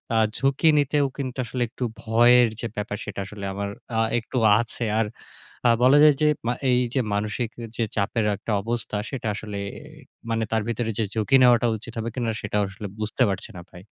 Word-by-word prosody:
আ - - +4 0.2
ঝুঁকি 135 +4 +2
নিতেও 145 0 +2
কিন্তু, 130 -3 -4
আসলে 125 +1 -4
একটু 130 +1 -6 0.2
ভয়ের 120 +2 +5
যে 115 - -3
ব্যাপার, 105 0 -3
সেটা 105 -2 -6
আসলে 100 0 -8
আমার 100 +1 -3 0.3
আ - - +3 0.2
একটু 115 +3 -6 0.2
আছে। 120 +1 -3 0.2
আর 115 - +2 0.6
আ - - +6
বলা 130 +3 +6
যায় 150 -1 +8
যে 155 - +4 0.2
মা 120 - +2 0.2
এইযে 125 +1 +1
মানসিক 105 +3 -1 0.3
যে 115 - +1
চাপের 110 +2 0
একটা 105 +3 -6
অবস্থা, 115 0 -3
সেটা 130 -5 -4
আসলে 105 0 -6 0.7
মানে 115 0 0
তার 110 -1 +2
ভিতরে 115 0 -2
যে - - +2
ঝুঁকি 110 +4 +2
নেওয়াটা 120 -1 +5
উচিত 115 +2 -10
হবে 115 +1 -2
কিনা? 120 -3 -1
সেটা 105 0 -2
আসলে 100 +2 -7
বুঝতে 110 +4 +1
পারছি 95 +2 -4
না - - -7
ভাই। 90 - -12
115 Hz, 190 wpm, -24 LUFS, 105-125 Hz, 0.7 s, যায়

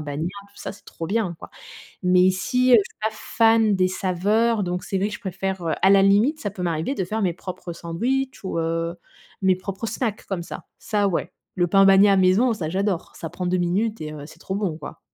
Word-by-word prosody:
bagnat, 150 +1 -3 0.2
tout 200 - -27
ça, - - -6
c'est 200 - -18
trop 165 - -7
bien, 195 -4 -1
quoi, - - -11 0.5
mais 180 0 +4
ici, 190 +8 +2
je - - +8
suis 205 - -1
pas 220 - +1
fan 225 -1 +2
des 185 -1 +2
saveurs, 205 +5 +1
donc 180 0 -3
c'est 195 - -2
vrai 200 +2 0
que 210 - -6
je 210 - -8
préfère, 190 -2 -3
heu, 160 - +1
à 190 - +6
la 195 0 +6
limite, 210 +10 +4
ça 205 - -3
peut 185 -2 -7
m'arriver 170 - -1
de - - -2
faire 215 +4 -3
mes 180 -3 +1
propres 180 0 -7
sandwichs 245 +11 -2
ou 175 - -2
heu, 165 +1 -1 0.5
mes 190 -1 +4
propres 195 +4 -5
snacks 220 0 -3
comme 180 -4 -3
ça, - - -8
ça 205 -2 0
ouais. 175 - -2 0.2
Le 175 - +2
pain 195 +3 +5
bagnat 195 +1 +6
maison, 190 +7 +4
ça, 165 -7 -4
j'adore, 195 -1 -1
ça 165 - -6
prend 180 - -4
2 180 +1 +1
minutes 205 +6 0
et 155 0 -5
heu, 150 -2 -8
c'est - - -15
trop 190 - -5
bon, 195 -6 -2
quoi. 150 - -9
190 Hz, 230 wpm, -23 LUFS, 175-215 Hz, 0.5 s, je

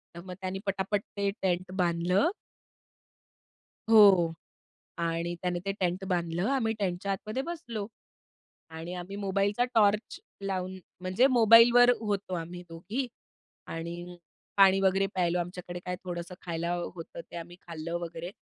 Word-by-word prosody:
तर 170 - -7
मग 185 - -7
त्यांनी 190 0 -3
पटापट 195 +1 0 0.2
ते 200 0 +1
टेंट 185 0 0
बांधलं. 180 - +2 1.6
हो. 195 -7 +7 0.6
आणि 170 +1 -1
त्याने 180 -1 -1
ते 195 - +1
टेंट 180 +1 0
बांधलं. 175 +2 0
आम्ही 225 -5 +1
टेंटच्या 195 0 -1
आतमध्ये 215 +6 -3
बसलो. 245 -11 -5 0.9
आणि 165 +3 -6
आम्ही 180 +3 -6
मोबाईलचा 200 +3 +1
टॉर्च 210 0 +3 0.2
लावून 190 -1 -3 0.2
म्हणजे 185 +7 +3
मोबाईलवर 240 +1 +7
होतो, 200 -4 -2
आम्ही 175 +1 -5
दोघी 200 +11 -4 0.6
आणि 170 +2 -6 0.4
पाणी 195 -1 +6
वगैरे 195 0 +3
प्यायलो. 180 -1 +1
आमच्याकडे 175 0 -5
काय 180 0 -3
थोडंसं 175 0 -5
खायला 170 0 -2 0.2
होतं, 170 0 -8
ते 170 - -11
आम्ही 175 +1 -8
खाल्लं 170 0 -4
वगैरे. 170 0 -6
185 Hz, 130 wpm, -29 LUFS, 175-200 Hz, 1.6 s, हो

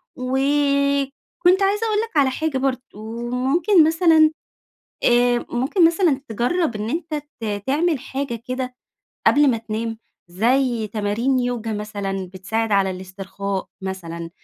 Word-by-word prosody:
وكنت 280 +6 +1
عايزة 415 +3 +1
أقول 430 -1 +1
لك 450 -9 -6
على 275 -2 +5
حاجة 310 +1 -2
برضه، 260 -1 0 0.5
ممكن 315 +9 +3
مثلًا 320 -1 +5 0.7
آآ، 240 0 +3
ممكن 270 +9 +3
مثلًا 330 -4 +2
تجرَّب 245 - 0
إن 210 +2 -3
أنت 320 +1 -3 0.3
ت 205 -3 -3
تعمل 305 +3 +1
حاجة 260 -3 -5
كده 255 0 -3 0.5
قبل 290 -1 +5
ما 235 - +1
تنام، 225 0 -4 0.3
زي 235 +4 +1
تمارين 215 +5 0
يوجا 240 -3 -2
مثلًا 200 -3 -4
بتساعد 220 +4 -2
على 195 -1 +3
الإسترخاء 190 +1 -5
مثلًا، 170 -3 -5
255 Hz, 125 wpm, -22 LUFS, 215-290 Hz, 0.7 s, على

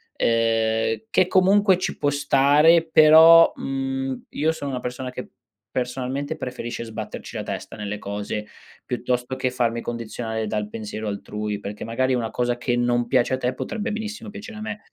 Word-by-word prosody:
ehm, 115 - +1
che 185 -4 +3
comunque 190 +1 +4
ci 185 - -3
può 145 - +1
stare, 145 +4 +4
però, 160 +2 +8
mhmm, 135 -1 -3
io 155 +2 0
sono 145 -3 -5
una 125 - -3
persona 125 +1 -5
che, 125 0 -7 0.4
personalmente, 130 +4 -3
preferisce 125 -5 -5
sbatterci 110 -2 -7
la - - -3
testa - - -6
nelle 105 0 -4
cose 105 +1 -4 0.4
piuttosto 125 +1 -2
che 130 -1 -1
farmi 120 -2 0
condizionare 115 -1 -4
dal 105 -1 -2
pensiero 110 0 -6
altrui, 105 0 -4
perché 105 +1 -6
magari 130 +3 0
una 120 -3 -1
cosa 120 +2 -1
che 120 0 -1
non 120 0 +1
piace 125 +1 +2
a - - +1
te 125 0 -1
potrebbe 215 - -4
benissimo 215 0 -5
piacere 215 +2 -9
a - - -7
me. 215 -1 -5
125 Hz, 165 wpm, -23 LUFS, 115-150 Hz, 0.4 s, però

